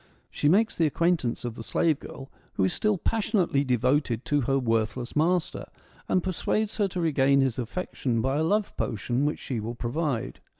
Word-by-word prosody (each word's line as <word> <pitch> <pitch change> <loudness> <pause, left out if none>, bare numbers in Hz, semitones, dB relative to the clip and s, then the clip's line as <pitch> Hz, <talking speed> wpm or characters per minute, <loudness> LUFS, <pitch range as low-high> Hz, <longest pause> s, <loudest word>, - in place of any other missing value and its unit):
She 145 - +1
makes 215 +6 +3
the 165 - +3
acquaintance 160 -7 0
of 120 - -3
the 115 - -8
slave 160 +4 +1
girl, 135 0 -10 0.2
who 95 - 0
is 95 - +1
still 215 -2 +1
passionately 195 -8 +1
devoted 125 -1 +1
to 145 -1 +1
her 135 +2 +1
worthless 115 0 -1
master, 170 +3 0 0.4
and 185 - +2
persuades 205 +4 -1
her 205 -2 +2
to 180 -1 -5
regain 140 -4 +3
his 130 -2 0
affection 125 -2 -2
by 135 +4 0
a 155 - +1
love 205 +5 0
potion 120 +5 -1
which 150 - 0
she 125 -5 -4
will 115 +3 -5
provide. 125 +1 -2
140 Hz, 180 wpm, -27 LUFS, 120-175 Hz, 0.4 s, makes